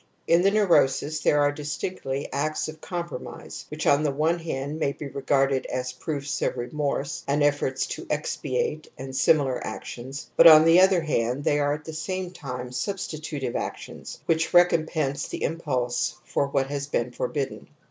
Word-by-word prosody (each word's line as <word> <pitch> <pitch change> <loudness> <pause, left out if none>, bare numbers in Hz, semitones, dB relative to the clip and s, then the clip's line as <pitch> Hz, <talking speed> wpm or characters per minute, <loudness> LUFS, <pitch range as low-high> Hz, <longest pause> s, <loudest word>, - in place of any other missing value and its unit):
In 170 +1 +4
the 195 - +5
neurosis 155 -8 +3
there 145 -1 +3
are 145 0 +3
distinctly 145 -1 -4
acts 155 +2 -1
of 155 0 -9
compromise 170 -6 -6
which - - -5
on 140 +1 +4
the 150 - +1
one 155 +5 +1
hand 150 -2 -4
may 140 -3 0
be 145 - -7
regarded 135 -1 +1
as 130 0 -3
proofs 145 +1 -4
of - - 0
remorse 140 +3 -2
and 145 +1 +2
efforts 145 -2 +1
to - - -7
expiate 150 0 -2
and 135 0 -7
simihar 135 -1 +3
actions; 130 +4 -7
but - - +9
on 155 -1 +9
the 165 +2 +7
other 190 -2 +5
hand 130 -3 -1
they 145 - +2
are 145 0 +2
at 150 0 -11
the 160 - -6
same 180 +3 -3
time 125 -7 -6
substitutive 150 -3 -4
actions - - -6
which 160 +1 +1
recom 175 -2 +5
pense 145 -4 -2
the - - -5
impulse 130 -4 -1
for 140 - 0
what 140 -1 +1
has 140 0 -4
been 125 -4 -1
forbidden. 135 +3 -3
145 Hz, 170 wpm, -25 LUFS, 135-160 Hz, -, but